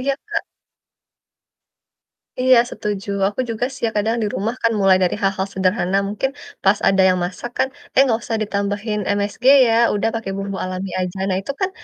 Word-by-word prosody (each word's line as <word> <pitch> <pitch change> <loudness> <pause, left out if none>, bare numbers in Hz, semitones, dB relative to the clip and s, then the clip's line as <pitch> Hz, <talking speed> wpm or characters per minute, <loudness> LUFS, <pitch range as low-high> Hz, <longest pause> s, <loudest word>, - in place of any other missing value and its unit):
Iya, 275 +1 0 0.2
Kak. - - -1 2.0
Iya 255 -1 +6
setuju, 205 -1 -4 0.2
aku 205 +5 -6
juga 230 +2 -1
sih, - - -12
ya - - -2
kadang 220 +2 +1
di - - 0
rumah 220 +5 -2
kan 230 - +3
mulai 190 -1 +5
dari 180 - +1
hal-hal 195 0 0
sederhana 185 0 +1
mungkin 210 +6 -1 0.3
pas, 200 +1 +4
ada 195 0 +4
yang 185 - +2
masak 185 +6 -6
kan, 265 - +3 0.3
"Eh, 270 - +7
nggak 230 -3 +1
usah 225 - -2
ditambahin 205 +1 -2 0.2
MSG 205 +5 -4 0.2
ya, 225 - +2 0.2
udah 220 +2 +1
pakai 225 -4 -4
bumbu 195 -1 -4
alami 185 +1 -4
aja." 180 +1 -4
Nah, 185 - +1
itu 280 - -4
kan 380 - +2
205 Hz, 180 wpm, -20 LUFS, 190-225 Hz, 2.0 s, Eh